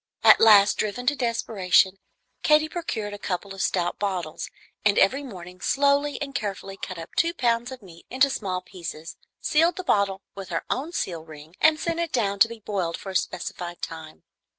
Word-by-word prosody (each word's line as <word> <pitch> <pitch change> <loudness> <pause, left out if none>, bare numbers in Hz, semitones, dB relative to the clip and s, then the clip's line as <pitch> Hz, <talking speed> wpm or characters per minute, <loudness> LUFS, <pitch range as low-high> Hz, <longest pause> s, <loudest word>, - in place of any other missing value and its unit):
At - - +8
last, 210 -2 +7
driven 215 +4 -2
to 290 +3 +3
desperation, 205 -6 +2 0.4
Katy 305 0 +4
procured 225 -12 -4
a 205 - -7
couple 195 0 -4
of 195 - -6
stout 175 -2 0
bottles, 185 -6 -3 0.3
and 205 -1 +3
every 260 +9 +4
morning 180 -8 -10
slowly 285 +1 +2
and 280 -2 -5
carefully 195 -6 -4
cut 185 -2 -7
up 165 +1 -8
two 335 +1 +2
pounds 240 -1 0
of 255 -4 -9
meat 170 -3 -15
into 260 +3 +4
small 185 -5 -3
pieces, 165 -3 -8 0.3
sealed 330 +3 +3
the 370 - -5
bottle 200 - +1
with 195 -2 -8
her 165 - -3
own 285 +6 -2
seal 170 - -3
ring, 155 +1 -13
and 315 0 +5
sent 335 0 -2
it 340 -2 -1
down 200 -5 0
to 225 - +7
be 230 - -8
boiled 190 -5 -2
for 195 - -7
a - - -10
specified 175 -1 -3
time. 160 -1 -7
200 Hz, 190 wpm, -25 LUFS, 180-260 Hz, 0.4 s, At